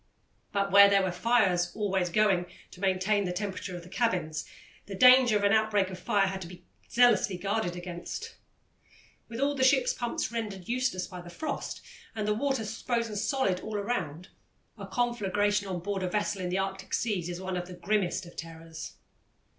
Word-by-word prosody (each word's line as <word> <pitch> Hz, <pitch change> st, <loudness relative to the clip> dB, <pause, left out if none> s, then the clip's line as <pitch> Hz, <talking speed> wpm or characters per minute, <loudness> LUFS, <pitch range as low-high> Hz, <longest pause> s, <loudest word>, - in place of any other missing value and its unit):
But 200 Hz, -1 st, 0 dB
where 200 Hz, +1 st, +9 dB
there 200 Hz, -1 st, +4 dB
were 185 Hz, -, 0 dB
fires 180 Hz, -3 st, +2 dB
always 190 Hz, -4 st, 0 dB
going 190 Hz, -2 st, +2 dB, 0.2 s
to 180 Hz, -, -13 dB
maintain 195 Hz, +2 st, +1 dB
the 180 Hz, -, -2 dB
temperature 190 Hz, -1 st, -4 dB
of 175 Hz, -, -10 dB
the -, -, -13 dB
cabins, 175 Hz, -9 st, -1 dB, 0.4 s
the 200 Hz, -, -6 dB
danger 250 Hz, 0 st, +7 dB
of 205 Hz, -, -3 dB
an 200 Hz, 0 st, +4 dB
outbreak 210 Hz, -3 st, +2 dB
of 185 Hz, -, -7 dB
fire 195 Hz, +2 st, +2 dB
had 190 Hz, 0 st, -3 dB
to 175 Hz, -, -6 dB
be 180 Hz, +1 st, -13 dB, 0.2 s
zealously 230 Hz, -6 st, +4 dB
guarded 195 Hz, -1 st, -1 dB
against. 175 Hz, -1 st, -6 dB, 1.0 s
With 230 Hz, +1 st, -6 dB
all 280 Hz, +1 st, +2 dB
the 265 Hz, -2 st, 0 dB
ship's 260 Hz, -1 st, +4 dB
pumps 240 Hz, -2 st, -3 dB
rendered 210 Hz, -6 st, -4 dB
useless 245 Hz, -7 st, 0 dB
by 180 Hz, -2 st, -9 dB
the 175 Hz, -, -11 dB
frost, 300 Hz, -, -5 dB, 0.3 s
and 210 Hz, -1 st, -2 dB
the 210 Hz, -, +3 dB
water 270 Hz, 0 st, -1 dB
frozen 230 Hz, +1 st, -2 dB
solid 205 Hz, -4 st, 0 dB
all 215 Hz, -, -6 dB
around, 185 Hz, -6 st, -3 dB, 0.5 s
a -, -, -8 dB
conflagration 205 Hz, -4 st, 0 dB
on 180 Hz, -2 st, -3 dB
board 195 Hz, +1 st, -3 dB
a 185 Hz, -, -1 dB
vessel 205 Hz, 0 st, -1 dB
in 180 Hz, -, -2 dB
the 180 Hz, -, 0 dB
Arctic 195 Hz, 0 st, -2 dB
seas 195 Hz, -7 st, -1 dB
is 175 Hz, 0 st, -5 dB
one 190 Hz, 0 st, -4 dB
of 180 Hz, 0 st, -3 dB
the 180 Hz, -, -9 dB
grimmest 185 Hz, 0 st, 0 dB
of 170 Hz, -, -13 dB
terrors. 165 Hz, 0 st, -8 dB
195 Hz, 185 wpm, -29 LUFS, 180-220 Hz, 1.0 s, where